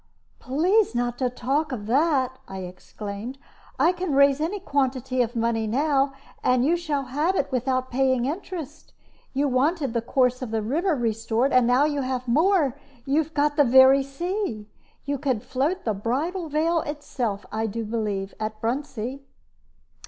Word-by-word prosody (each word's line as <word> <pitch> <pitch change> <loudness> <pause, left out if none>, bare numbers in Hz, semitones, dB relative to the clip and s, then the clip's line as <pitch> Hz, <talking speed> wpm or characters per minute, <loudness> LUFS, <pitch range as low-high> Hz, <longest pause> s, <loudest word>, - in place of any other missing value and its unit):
"Please 350 - +2
not 240 0 -1
to 255 -2 +1
talk 270 +5 -1
of 220 -5 -4
that," 260 0 +1
I 190 0 -6
exclaimed. 200 +6 -7 0.4
"I 340 - +4
can 360 -5 -2
raise 280 +1 +5
any 365 +6 -1
quantity 265 -5 0
of 240 0 -1
money 230 -1 0
now, 275 +3 +1 0.3
and 250 0 +3
you 330 +4 +3
shall 305 -5 -2
have 295 +8 0
it 285 - -1
without 255 0 -1
paying 260 -1 +2
interest. 315 -1 -6 0.4
You 285 +2 +2
wanted 275 +1 +1
the 235 - 0
course 250 +1 +1
of 255 - -4
the 220 -1 -1
river 320 - +1
restored, 230 +1 0
and 250 -2 +5
now 250 +4 +4
you 290 -2 0
have 255 -1 -3
more 305 +1 +3 0.3
you 285 +3 +3
have 320 +1 -9
got 290 0 +1
the 290 - +7
very 265 +2 +7
sea. 275 - -3 0.4
You 285 -1 -2
could 260 -6 -1
float 280 +9 -1
the 220 - +1
Bridal 300 - -2
Veil 325 +3 +1
itself, 245 -9 -4
I 220 +1 -1
do 225 +2 -4
believe, 210 -3 -2
at 215 0 -4
Bruntsea." 255 +1 -3
265 Hz, 165 wpm, -25 LUFS, 235-295 Hz, 0.4 s, the